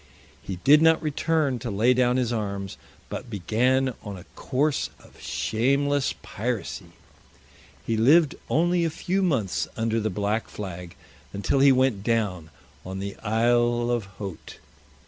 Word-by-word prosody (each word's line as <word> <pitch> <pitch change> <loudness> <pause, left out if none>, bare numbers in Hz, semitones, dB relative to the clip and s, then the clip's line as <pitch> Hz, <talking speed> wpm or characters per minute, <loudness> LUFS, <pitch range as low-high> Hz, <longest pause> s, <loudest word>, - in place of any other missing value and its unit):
He 95 - -5
did 150 +2 +7
not 160 0 +5
return 150 -3 0
to 120 - -5
lay 110 +5 +3
down 125 0 +2
his 120 -2 0
arms, 100 -3 -3 0.3
but 125 - -6
began 125 +6 +1
on 100 -2 -7
a 90 - -11
course 140 +2 0
of - - -19
shameless 140 +5 0
piracy. 110 -3 -4 0.9
He 115 - 0
lived 145 +7 +5 0.2
only 175 +2 +2
a 165 - +1
few 185 +5 -1
months 130 - 0
under 115 0 0
the 110 0 -1
black 105 +2 -1
flag, 90 -4 -7 0.4
until 100 +7 0
he 140 0 +7
went 130 -6 +2
down 105 -8 -1 0.3
on 95 +1 -6
the 100 +1 -5
Isle 120 +2 +1
of 120 -4 -1
Haut. 95 -6 -8
120 Hz, 145 wpm, -25 LUFS, 105-135 Hz, 0.9 s, did